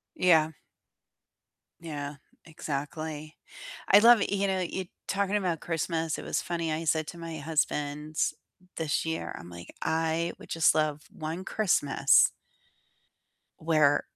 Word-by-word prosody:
Yeah. 160 -3 +4 1.3
Yeah, 145 -3 -6 0.3
exactly. 155 0 -5 0.5
I 200 - +8
love 230 0 +7
you 200 0 0
know, 190 -1 0
you 185 +1 -3 0.2
talking 200 +1 0
about 175 -5 -1
Christmas, 165 -1 -2
it - - -6
was - - -1
funny, 170 -2 -2
I 160 +2 -2
said 155 0 +1
to 170 - -8
my 165 -1 -6
husband 150 0 -2 0.6
this 160 0 -1
year, 160 0 -3
I'm 85 - -11
like, 85 0 -11
"I 160 +1 0
would - - -14
just 165 -1 +4
love 155 -1 0
one 165 +4 -5
Christmas" 145 -11 +3 1.3
where 155 -3 +3
160 Hz, 125 wpm, -28 LUFS, 150-170 Hz, 1.3 s, I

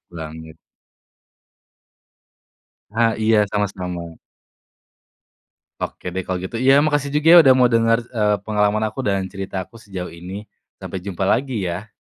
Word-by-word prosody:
Banget. 80 -1 -9 2.3
Ah 115 +1 +2
iya 110 -1 +4
sama-sama. 90 -5 -3 1.6
Oke 90 - -5
deh 95 - -2
kalau 95 -1 -2
gitu. 95 +5 -5
Iya 135 +3 +5
makasih 145 -2 0
juga 165 +3 +8
udah 135 -4 +6
mau 125 -1 +5
denger, 115 0 +3
eee, 105 -2 +2
pengalaman 105 0 +1
aku 135 - -7
dan 100 -1 0
cerita 95 -1 -5
aku 115 +3 -17
sejauh 95 -6 -7
ini. 90 +5 -8 0.3
Sampai 95 - -6
jumpa 95 0 -4
lagi 120 0 0
ya. 100 +6 -6
105 Hz, 130 wpm, -21 LUFS, 90-115 Hz, 2.3 s, juga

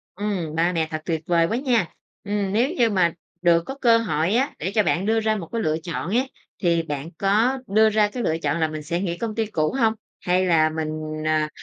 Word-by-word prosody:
Ừm, 185 -6 -3
ba 170 +2 +2
mẹ 160 -2 0
thật 155 0 -3
tuyệt 160 -3 -1
vời 170 -2 +3
quá 225 - -1
nha! 245 - 0 0.3
Ừm, 200 -1 -2
nếu 240 +6 +2
như 235 -2 +4
mà 180 -5 +2 0.3
được 170 -1 +4
có 270 - -6
cơ 230 -2 +6
hội 175 -5 0
á 265 +4 +1
để 185 +5 -2
cho 215 - +4
bạn 180 +1 0
đưa 225 +1 +2
ra 220 0 +1
một 180 -6 -5
cái 230 - -1
lựa 155 -4 +1
chọn 170 0 -4
á, 245 +6 +2 0.4
thì 170 -1 +2
bạn 145 -1 -5
có 220 +7 +2
đưa 220 +2 +4
ra 215 -1 +3
cái 245 +3 -4
lựa 160 -4 0
chọn 150 0 -1
là 160 - +2
mình 155 -1 -6
sẽ 170 +4 -2
nghỉ 175 -3 -2
công 225 0 -4
ty 225 0 0
cũ 155 -7 -1
hông? 225 -2 +3 0.3
Hay 180 +1 +1
là 160 -3 +4
mình, 155 0 -3 0.4
à, 155 -1 +1
185 Hz, 245 wpm, -23 LUFS, 160-220 Hz, 0.4 s, cơ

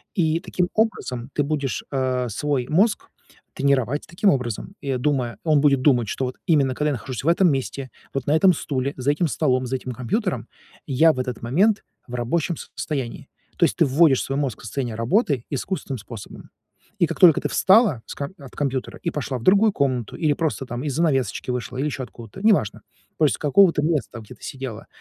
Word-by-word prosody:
И 165 -4 +2
таким 180 0 -2
образом 140 - -1
ты 145 - +1
будешь, 140 -3 -2
э, 130 -2 0
свой 135 +2 -1
мозг 200 +8 +2 0.4
тренировать 140 0 +1
таким 190 +4 +2
образом. 125 - -3
И, 140 - -5
о, 130 - 0
думая, 125 -5 -1
он 155 -3 +3
будет 140 -3 +4
думать, 125 -6 +3
что 130 - -2
вот 125 - -5
именно 140 -6 +3
когда 150 +2 0
я 145 - 0
нахожусь 130 +1 -5
в - - -4
этом 170 +1 +4
месте, 135 -1 -3 0.2
вот 135 -2 -2
на 150 - +3
этом 185 +2 +5
стуле, 140 -2 -2
за 135 +3 +1
этим 165 +3 0
столом, 130 -4 0
за 130 - -2
этим 130 0 -5
компьютером, 175 - -2 0.4
я 155 +4 +4
в 130 - -6
этот 125 -2 -4
момент 195 - +2 0.2
в 125 - -6
рабочем 155 +8 -1
состоянии. 130 -7 -5 0.3
То - - +2
есть - - -1
ты - - +4
вводишь 140 0 +4
свой 135 +1 -3
мозг 135 -5 -2
в - - -12
состояние 120 +1 -3
работы 135 - +1
искусственным 140 -2 -3
способом. 110 0 -10 0.5
И - - +4
как - - -5
только 170 -5 +7
ты - - -2
встала 195 - +4
с - - -7
ка 140 +5 -5
от 140 -3 -13
компьютера 135 -3 -3
и 170 - 0
пошла 140 -3 -3
в 115 - -9
другую 205 +5 +5
комнату 130 -5 -1
или 155 -3 +1
просто, 150 -3 -2
там, 120 +1 -5
из-за 145 -1 -2
занавесочки 135 -6 0
вышла, 125 +1 -4
или 140 - -1
ещё 135 -2 -4
откуда-то, 120 - -11
неважно. 205 - +2 0.4
То 155 - +4
есть 145 - +2
с - - -13
какого-то 165 +1 +4
места, 150 -6 -1
в, 110 - -11
где - - -12
ты - - -21
сидела, 130 -5 -6
140 Hz, 210 wpm, -23 LUFS, 125-160 Hz, 0.5 s, только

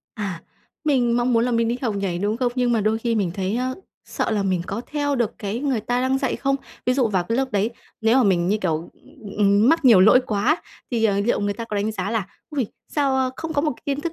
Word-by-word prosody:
À, 190 -6 -4 0.4
mình 245 -5 +2
mong 245 +1 +1
muốn 230 0 +3
là 250 - 0
mình 230 -1 +1
đi 240 - 0
học 225 -5 0
nhảy, 185 -3 -2
đúng 205 +3 0
không? 245 -1 0
Nhưng 250 -1 +1
mà 230 - +2
đôi 215 +2 +1
khi 230 0 -1
mình 200 -5 0
thấy, 195 +3 -1
a, 255 +1 -1 0.3
sợ - - -2
là 210 -2 +1
mình 185 -3 0
có 205 - -3
theo 290 -1 -1
được 235 -4 -1
cái 205 +2 -3
người 270 -5 0
ta 245 +3 -1
đang 260 +1 +1
dạy 265 -2 -1
không. 275 0 0 0.3
Ví 250 - +4
dụ 255 -4 +2
vào 185 -4 0
cái 230 - -1
lớp 265 -2 -1
đấy, 205 +3 +1 0.3
nếu 225 +2 +3
mà 265 - +5
mình 180 -5 +2
như, 210 - +2
kiểu, 160 -4 -2 0.5
ừm, 205 +3 +4
mắc 325 -2 +3
nhiều 225 -7 +7
lỗi 215 +6 +7
quá 245 +9 +1 0.3
thì, 230 -2 0
ờ, 200 -2 +2
liệu 210 +1 +1
người 205 0 0
ta 230 +2 -5
có 215 -2 -4
đánh 205 +2 -1
giá 195 -1 -3
là 225 -4 -1 0.2
"Ôi! 275 -6 -1 0.2
Sao, 275 -3 +1
a, 260 -1 +1
không 325 0 -4
có 285 -1 +1
một 310 - +1
cái - - -22
kiến 280 0 -1
thức 330 +2 -3
230 Hz, 270 wpm, -22 LUFS, 205-260 Hz, 0.5 s, nhiều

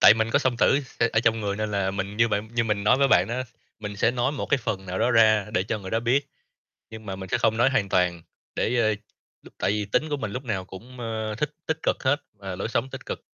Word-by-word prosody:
tại 105 - +9
mình 110 0 0
có 140 - +4
song 130 -4 0
tử 135 +3 +4
s - - -6
ở 110 - +3
trong 115 -1 +2
người, 100 -1 -2
nên 110 0 -2
là 100 -1 0
mình 100 +1 -4
như 115 +1 +4
bạn 105 +1 -1
như 115 -1 +2
mình 105 -2 -1
nói 110 - +5
với 140 - +4
bạn 90 -5 +4
á, 125 +2 -2 0.3
mình 105 -1 -6
sẽ 115 - +3
nói 125 +3 0
một 140 - -4
cái 140 - +2
phần 95 -5 -3
nào 90 0 -3
đó 125 - +2
ra 110 -3 +5
để 95 - +3
cho 110 +2 -3
người 95 -2 -8
đó 115 - +1
biết, 135 +4 +1 0.6
nhưng 110 -1 -10
mà 95 - -4
mình 95 -1 -7
sẽ - - +1
không 110 -1 +2
nói 120 +3 +4
hoàn 115 -8 +1
toàn, 90 -2 +1 0.3
để, 125 - 0
ơ 110 -2 +3 0.5
lúc - - -16
tại - - +1
vì 105 0 0
tính 150 +10 0
của 145 - -1
mình 110 -7 -4
lúc 130 +2 -5
nào 100 -6 -2
cũng, 120 +7 -11
a, 110 -2 -3
thích 150 +2 -1 0.2
tích 160 0 -1
cực - - +1
hết, 145 +3 +2
và 95 -3 -7
lối 100 - -3
sống 130 +3 -1
tích - - -9
cực, - - -4
110 Hz, 285 wpm, -25 LUFS, 100-125 Hz, 0.6 s, tại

